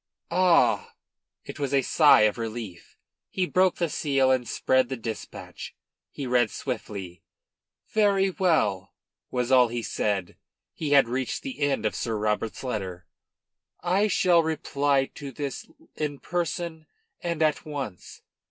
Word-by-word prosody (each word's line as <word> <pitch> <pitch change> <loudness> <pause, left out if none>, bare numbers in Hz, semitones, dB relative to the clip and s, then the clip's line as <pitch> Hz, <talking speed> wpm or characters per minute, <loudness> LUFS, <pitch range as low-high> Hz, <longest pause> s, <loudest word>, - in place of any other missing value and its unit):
"Ah!!" 180 -1 +3 0.5
It - - -8
was 140 -1 0
a 135 - +3
sigh 150 +2 +6
of 110 +2 +2
relief. 110 -6 -7 0.3
He 185 - 0
broke 185 0 +2
the 170 - 0
seal 135 -3 +1
and 125 -2 +1
spread 130 -1 +1
the 130 - -3
dispatch. 115 -1 -7 0.3
He 140 - -6
read 120 -2 +2
swiftly. 100 -9 -6 0.7
"Very 200 -3 +3
well," 155 - +1 0.3
was 125 0 -1
all 125 -2 +6
he 120 0 -4
said, 100 -4 -1
when - - -21 0.4
he 150 -3 -4
had 140 -4 +6
reached 125 +1 -3
the 270 -2 -6
end 140 -5 0
of 110 - +1
Sir 115 -2 -2
Robert's 105 +2 -2
letter. 95 -8 -4 0.8
"I 190 +4 +2
shall 180 -3 +4
reply 145 -3 +1
to 140 -2 -8
this 140 +1 -5 0.3
in 150 -2 -3
person 170 -1 -3 0.3
and 170 -2 -1
at, 155 -2 +1
once. 135 - -7
135 Hz, 145 wpm, -26 LUFS, 115-165 Hz, 0.8 s, sigh